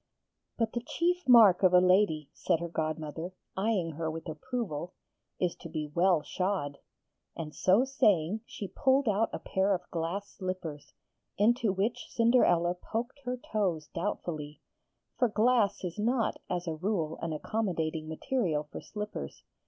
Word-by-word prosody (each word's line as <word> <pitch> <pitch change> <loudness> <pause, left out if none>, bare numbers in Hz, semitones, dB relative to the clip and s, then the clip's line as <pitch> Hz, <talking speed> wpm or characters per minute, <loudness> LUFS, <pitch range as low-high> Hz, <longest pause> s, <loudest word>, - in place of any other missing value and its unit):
'But 225 -2 0
the 240 - -2
chief 350 +4 -1
mark 220 -7 +8
of 185 -2 +5
a - - +9
lady,' 180 -5 +3
said 170 -3 0
her 170 - -3
godmother, 160 +2 -4 0.2
eyeing 190 -4 0
her 160 +1 -3
with 165 +2 -6
approval, 175 - -4 0.4
'is 180 -2 0
to 170 - -9
be 155 -2 -4
well 175 -3 +3
shod,' 185 -7 -2 0.6
and 155 -2 -6
so 195 +8 +4
saying 210 - +2
she 200 - -6
pulled 265 +7 +2
out 215 +2 +2
a - - -3
pair 190 +1 +1
of 180 0 -8
glass 175 +5 -2
slippers, 185 -7 -6 0.4
into 225 +1 +3
which 200 +5 -1
Cinderella 205 -8 +3
poked 230 +9 -5
her 250 0 -2 0.2
toes 180 -8 0
doubtfully, 155 -5 -4 0.6
for 245 - +4
glass 220 -1 +2
is 180 +2 -4
not 230 +2 +1
as 180 -1 -2
a 165 - -1
rule 165 -2 -2
an 165 - -2
accommodating 160 -3 -2
material 165 - -1
for - - -6
slippers. 210 -1 -6
185 Hz, 150 wpm, -30 LUFS, 160-220 Hz, 0.6 s, a